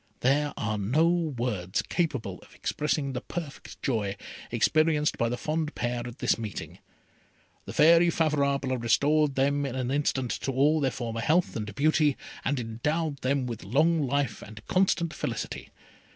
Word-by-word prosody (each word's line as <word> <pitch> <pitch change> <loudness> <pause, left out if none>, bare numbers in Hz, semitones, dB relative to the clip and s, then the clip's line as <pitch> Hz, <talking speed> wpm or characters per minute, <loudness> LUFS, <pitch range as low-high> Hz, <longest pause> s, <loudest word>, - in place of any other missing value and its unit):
There 145 +3 +2
are 105 0 -1
no 130 +12 +3
words 125 - -1
capable 155 -9 -2
of - - -18
expressing 150 -2 -1
the 125 - -3
perfect 160 -3 -7
joy 105 -7 -1 0.3
experienced 155 -1 +2
by 115 - 0
the 125 - -2
fond 155 +2 -2
pair 120 +2 -1
at 120 +1 -9
this - - +1
meeting. 110 -3 -6 0.9
The - - -7
Fairy 170 +2 +6
Favourable 140 -5 +1
restored 145 +5 +2
them 140 +2 +2
in 135 -2 -3
an 130 -1 -2
instant 135 -3 0
to 135 - -1
all 145 +4 +3
their 135 -3 +2
former 115 -3 -4
health 165 +9 +2
and 105 -2 -4
beauty, 150 0 +3 0.3
and 140 0 0
endowed 145 +7 -2
them 135 0 0
with 120 -3 -5
long 155 - +2
life 135 -4 -1
and 110 +1 -11
constant 180 -3 +1
felicity. - - -4
140 Hz, 155 wpm, -28 LUFS, 120-155 Hz, 0.9 s, Fairy